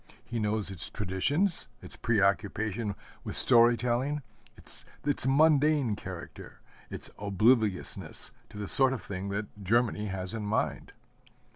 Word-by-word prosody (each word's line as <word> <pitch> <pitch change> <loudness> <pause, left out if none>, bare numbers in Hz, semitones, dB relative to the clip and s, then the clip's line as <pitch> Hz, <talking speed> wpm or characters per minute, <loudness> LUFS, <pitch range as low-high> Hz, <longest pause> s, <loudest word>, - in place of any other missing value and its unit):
He 120 - -3
knows 105 -1 -1
its 90 -4 -1
traditions, 130 - +1 0.2
its - - -9
preoccupation 105 -1 0 0.3
with - - -4
story 120 -1 +6
telling, 125 +5 -1 0.3
its - - -3 0.4
mundane 145 -4 +4
character, - - -9 0.3
its - - -6
obliviousness 105 0 +1 0.2
to - - -11
the 105 -1 -4
sort 135 +3 +4
of 130 - -5
thing 95 0 -5
that 100 0 -5
Germany 110 +1 +1
has 95 0 -3
in 115 - -3
mind. 105 +2 -2
110 Hz, 125 wpm, -29 LUFS, 100-125 Hz, 0.4 s, story